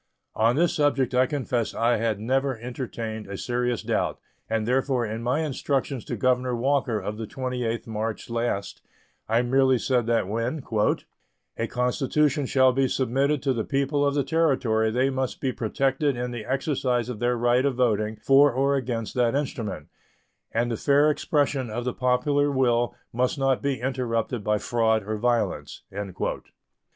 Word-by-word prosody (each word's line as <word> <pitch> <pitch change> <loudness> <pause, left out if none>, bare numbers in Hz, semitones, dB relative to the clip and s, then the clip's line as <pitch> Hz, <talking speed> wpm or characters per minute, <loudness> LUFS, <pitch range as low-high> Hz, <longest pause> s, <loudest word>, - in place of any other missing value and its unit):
On 115 +2 +2
this 170 +2 +2
subject 145 -3 +1
I 130 +1 +4
confess 130 -6 -2
I 120 +1 +2
had 110 -2 -1
never 130 +3 0
entertained 115 -3 -5
a 100 0 -6
serious 120 0 -1
doubt, - - -1 0.3
and 110 -1 -1
therefore 130 -1 +1
in 110 +1 -4
my 125 +6 0
instructions 140 -3 -2
to 120 - -3
Governor 125 +2 +1
Walker 125 -2 +1
of 105 +2 -5
the 110 - -4
28th 125 -3 -3
March 110 -1 -4
last 115 -4 -2 0.5
I 115 +2 +3
merely 130 +1 +3
said 120 -1 0
that 115 -5 +1
when 115 +7 -2 0.9
"a 115 - -2
constitution 135 +4 +1
shall 130 -1 +4
be 135 +1 +2
submitted 135 +3 0
to 135 -2 +2
the 115 -3 -1
people 140 +3 0
of 140 0 +1
the 140 - +2
Territory 130 -8 +2
they 130 +4 +1
must 130 -1 -2
be 130 - 0
protected 135 +4 0
in 125 0 -3
the 120 -3 -6
exercise 130 -3 0
of 125 -4 -5
their 120 +1 +1
right 120 +2 +3
of 140 -2 +1
voting 110 -3 +1
for 135 +6 +5
or 135 +3 +1
against 120 -4 -3
that 120 0 +2
instrument, 115 - -3 0.6
and 120 +1 0
the 115 - -1
fair 145 +4 +4
expression 140 -4 0
of 120 +3 -4
the 125 - -1
popular 145 +3 +1
will 120 -3 +1 0.2
must 125 +5 0
not 135 -1 +1
be 140 -3 -1
interrupted 120 -3 -2
by 105 +1 +1
fraud 110 -1 +1
or 110 +2 -3
violence." 120 +1 -1
125 Hz, 165 wpm, -25 LUFS, 115-135 Hz, 0.9 s, for